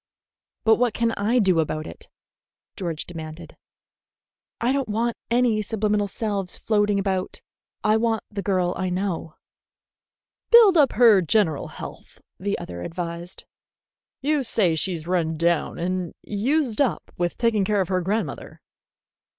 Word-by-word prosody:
"But 220 0 +5
what 245 -2 +1
can 230 -1 +1
I 225 +4 0
do 190 -7 +3
about 155 0 -1
it?" - - -10 0.7
George 170 -5 -4
demanded. 160 -1 -9 1.0
"I 240 +2 +1
don't 275 -3 -1
want 230 +2 0
any 235 -3 +2
subliminal 210 -1 0
selves 200 -2 -2
floating 210 -2 +1
about. 190 -2 -2 0.4
I 215 +1 +4
want 225 -1 0
the 205 -1 -4
girl 185 -3 0
I 185 -1 -1
know." 180 -4 -3 1.1
"Build 455 -5 +8
up 290 -5 +4
her 220 -5 +6
general 170 -4 +1
health," - - -10 0.2
the 200 +1 -1
other 85 -1 -7
advised. 170 - -6 0.8
"You 295 0 +2
say 215 -8 +2
she's 160 0 -1
run 165 -3 0
down 170 0 +1
and 180 0 -3
used 245 +4 0
up 275 - -1
with 175 -1 -1
taking 230 -4 +2
care 205 +1 +1
of 185 - -3
her 185 -1 +1
grandmother. 205 +5 -3
200 Hz, 140 wpm, -24 LUFS, 175-225 Hz, 1.1 s, Build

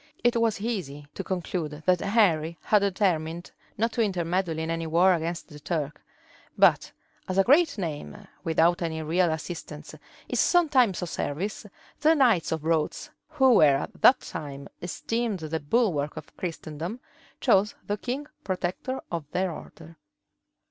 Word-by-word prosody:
It 240 0 +3
was 225 -3 +1
easy 180 -11 -4
to - - -5
conclude 165 -4 -4
that 180 -1 +4
Henry 170 -7 +2
had 210 - +4
determined 180 -4 -1 0.3
not 230 +2 +1
to 230 - -1
intermeddle 180 -4 0
in 160 +1 -2
any 165 0 -2
war 175 +4 +4
against 170 +1 -3
the 150 -2 -11
Turk; 150 -2 -3 0.6
but - - +4 0.4
as 185 - -1
a 195 - +6
great 290 - +4
name, 150 - -5 0.3
without 165 +2 +2
any 160 -2 -2
real 170 +2 +2
assistance, 160 -1 -6 0.3
is - - -2
sometimes 265 - +3
of 175 - -4
service, 190 +10 -3 0.3
the 315 +2 +4
knights 240 - +3
of 160 -2 -2
Rhodes, 165 - -1 0.2
who 265 -5 +4
were 150 -9 +6
at - - -7
that 260 - +7
time 140 -2 -7
esteemed 225 +5 -2
the 160 +1 -3
bulwark 155 -4 0
of 155 - -10
Christendom, 165 +4 -5 0.4
chose 210 -4 +3
the 205 - -1
king 260 +6 -4 0.2
protector 185 +8 -3
of 165 -3 -3
their 185 0 0
order. 165 0 -11
175 Hz, 150 wpm, -26 LUFS, 160-215 Hz, 0.6 s, that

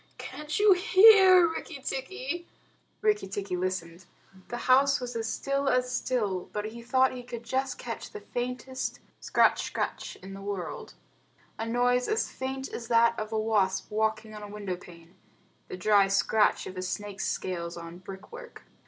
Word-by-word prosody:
Can't 300 0 -5
you 415 -1 +7
hear, 380 -2 +7
Rikki 320 -2 -6
tikki?" 280 +4 -4 0.6
Rikki 425 -1 +2
tikki 195 -1 -3
listened. 180 -1 -3 0.4
The 240 - -4
house 275 +2 +5
was 245 -1 -6
as 225 -1 -2
still 275 +2 -1
as 250 0 +1
still, 205 -10 -1
but 210 0 -2
he 230 +2 -7
thought 260 +2 +3
he 250 - -7
could 240 -1 -8
just 260 +3 -2
catch - - -6
the 425 - -8
faintest 250 0 -4 0.2
scratch - - +3
scratch - - -3
in 195 +1 -8
the 195 - -8
world 195 -3 -5 0.6
a 225 - -2
noise 245 +1 +2
as 440 +1 0
faint 265 +1 -4
as 230 - -5
that 235 0 +4
of 215 0 -4
a 220 - -1
wasp 205 -4 +1
walking 220 0 -1
on 210 - -8
a 205 - -7
window 200 -3 -4
pane 170 -1 -15 0.5
the - - -7
dry 200 +1 +4
scratch 205 +2 +2
of 185 - -7
a - - -2
snake's 200 +1 -4
scales 170 -2 -3
on 170 +1 -9
brick 190 - -10
work. 480 0 -11
230 Hz, 170 wpm, -28 LUFS, 195-265 Hz, 0.6 s, you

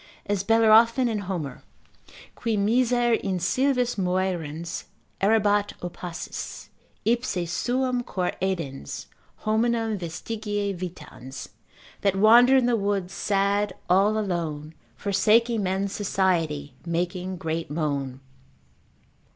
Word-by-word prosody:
As 200 -2 0
Bellerophon 225 +3 +5
in 220 -3 -1
Homer, 155 -9 -4 0.7
Qui 225 -3 -1
miser 240 +3 +2
in 195 -4 0
sylvis 250 +4 +1
moerens 175 -3 -2 0.4
errabat 205 0 +3
opacis, 175 -1 -6 0.4
Ipse 230 -7 0
suum 250 +8 0
cor 185 -6 -2
edens, 165 - -3 0.4
hominum 225 -1 +1
vestigia 205 +4 -3
vitans. 165 -7 -8 0.5
That 195 -1 +2
wandered 240 +6 +7
in 255 - +3
the 245 -1 +3
woods 200 -3 -1
sad 200 0 +1 0.2
all 200 +4 +4
alone, 165 -7 -3 0.2
Forsaking 215 - +2
men's 190 +1 -1
society, 165 -8 0
making 180 +2 -2
great 165 -3 -3
moan. 140 -4 -2
195 Hz, 100 wpm, -25 LUFS, 175-225 Hz, 0.7 s, wandered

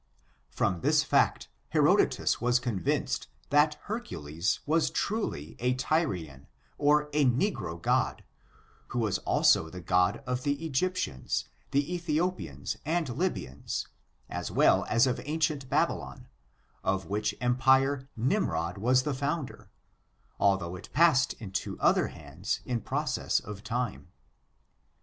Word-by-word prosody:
From 90 -4 -1
this - - +3
fact, - - +2 0.2
Herodotus - - +3
was 120 +1 +3
convinced 115 -8 -1 0.2
that 150 +1 +4
Hercules 95 - -3
was 160 +2 +2
truly 200 - -2
a 125 +1 +1
Tyrian, 95 - -1 0.3
or 150 +1 +4
a 150 0 +3
negro 125 - 0
god, - - 0 0.6
who - - -5
was 105 -4 +1
also 80 - +3
the 90 - -8
god 90 +7 +1
of 125 0 -2
the 145 +3 -1
Egyptians, 160 - -1 0.2
the 145 +5 0
Ethiopians, 175 +1 -2
and 160 -1 0
Lybians, 120 - -3 0.4
as - - -4
well - - +4
as 115 +3 +4
of 125 -2 -1
ancient 150 -3 -1
Babylon, - - -1 0.6
of 95 0 0
which 105 +2 -1
empire 130 +2 +3
Nimrod 100 - 0
was 125 +4 +3
the 150 - -1
founder, 145 +2 -3 0.7
although 95 -3 +2
it 90 - -10
passed 150 -5 +4
into 100 -4 -5
other - - +3
hands 80 +7 -5
in 120 -2 -2
process - - 0
of 105 -1 -9
time. 115 - -3
125 Hz, 120 wpm, -29 LUFS, 95-150 Hz, 0.7 s, that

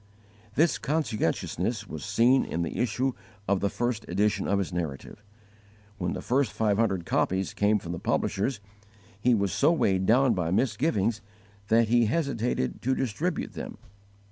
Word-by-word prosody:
This 165 +4 +3
conscientiousness 145 -8 -1
was 75 -3 -7
seen 125 - +3
in 85 - -2
the 85 - -4
issue 125 +3 0 0.4
of 100 0 +2
the 100 - 0
first 120 +1 -2
edition 100 +2 +1
of 100 - +2
his 95 -2 -2
Narrative. 85 +3 -5 0.8
When 90 -1 -1
the - - -5
first 130 -2 +1
five 105 -1 +1
hundred 95 -7 +1
copies 95 +3 0
came 105 +1 +2
from 85 -4 -6
the 85 - -4
publishers, 105 +4 -1 0.6
he 120 +3 +3
was 100 -3 0
so 145 +4 +4
weighed 95 - +1
down 125 +2 +5
by 90 -5 -1
misgivings 110 - +1 0.5
that 115 +1 +3
he 120 -1 +4
hesitated 120 - -1
to 130 +1 +1
distribute 115 -7 -2
them. - - -7
105 Hz, 155 wpm, -27 LUFS, 95-125 Hz, 0.8 s, down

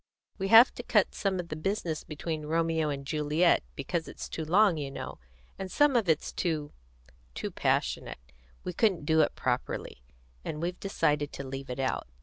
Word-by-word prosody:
We 195 - -1
have 225 +5 +8
to - - -6
cut - - +2
some 195 -2 -1
of 170 -1 -5
the 155 - -3
business 165 -1 -2
between 155 0 -5
Romeo 165 -1 +1
and 140 -1 -4
Juliet, 155 +4 +2
because - - -3
it's - - -7
too 110 - -4
long, 185 +2 +4
you 145 -2 -3
know, 135 - -7 0.4
and 190 -1 -5
some 290 +3 +4
of 220 -7 +2
it's 160 -2 +1
too 155 -4 -2 0.6
too - - -4
passionate; - - 0 0.5
we 180 - -4
couldn't 185 -6 +1
do 160 +1 +4
it 150 - +1
properly, 125 - -2 0.4
and 150 - -4
we've 175 +2 -3
decided 150 -7 0
to 140 - -6
leave 135 0 -6
it 125 - -4
out. 130 - -1
160 Hz, 180 wpm, -29 LUFS, 145-180 Hz, 0.6 s, have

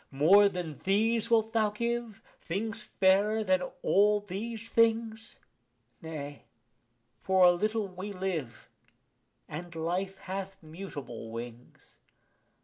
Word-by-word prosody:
More 185 +9 +6
than 175 -6 -5
these 220 +4 +2
wilt 225 -1 +2
thou 220 -2 +3
give, 235 0 -3 0.2
things 220 +5 -2
fairer 205 +4 +2
than 185 -2 +2 0.2
all 210 +1 +4
these 215 +3 -6
things? 225 -1 +1 0.6
Nay, 145 -3 -7 0.8
for 190 -1 +4
a 175 - +8
little 215 +4 -1
we 185 +2 -7
live, 180 - -4 0.8
and 170 +2 -7
life 180 +4 -2
hath 195 +1 -6
mutable 155 -9 -8
wings. 120 +1 -10
195 Hz, 110 wpm, -30 LUFS, 170-220 Hz, 0.8 s, a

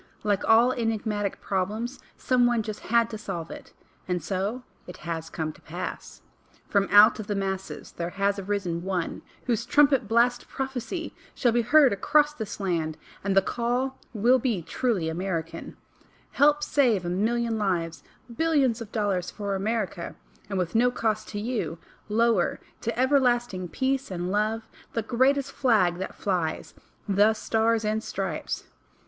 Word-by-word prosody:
Like 205 -2 +1
all 230 +3 +6
enigmatic 220 -4 -2
problems, 210 +7 -2 0.2
some 250 -1 +3
one 240 -2 +1
just 215 -1 -5
had 235 0 +2
to 220 - -5
solve 175 -6 -5
it— - - -10 0.4
and 180 -3 -1
so 200 +8 -2 0.2
it 180 - -9
has 165 -1 -4
come 155 -1 -3
to - - -20
pass. 175 +3 -7 0.4
From 200 -1 +2
out 210 +2 +7
of 210 - -6
the 205 - -1
masses 190 -1 -4
there 170 0 -4
has 200 +1 0
arisen 190 -4 -2
one 180 -2 -2 0.2
whose 235 -4 0
trumpet 275 -5 +4
blast 235 +3 +2
prophecy 270 +5 -4 0.2
shall 245 - +2
be 240 +1 +2
heard 275 +1 +5
across 295 +9 +3
this 220 -8 -6
land, 165 -5 -1 0.3
and 195 -1 0
the 195 - +6
call 245 +4 -1
will 245 +3 +4
be 225 -8 -1
truly 210 -5 -1
American: 165 -1 -4 0.5
"Help 295 +1 +4
save 235 -13 +2
a - - -2
million 225 +5 0
lives, 170 -5 -1 0.3
billions 285 -7 +2
of 225 -2 -8
dollars 200 -5 0
for 200 -2 -4
America, 195 -3 -2 0.3
and 195 - -2
with 180 -2 -1
no 240 +2 +4
cost 220 -3 -1
to 205 - -5
YOU, 220 -6 -2 0.3
lower 225 -3 +2 0.2
to 230 +1 -3
everlasting 245 -8 +2
Peace 265 - -1
and 180 -1 -3
Love, 215 +2 0 0.3
the 230 - -1
Greatest 265 +4 +2
Flag 185 -9 +2
that 190 - -5
flies 175 -5 -2 0.3
THE 205 +2 +4
STARS 225 0 +1
AND 215 +1 0
STRIPES!" - - -3
215 Hz, 155 wpm, -26 LUFS, 190-240 Hz, 0.5 s, out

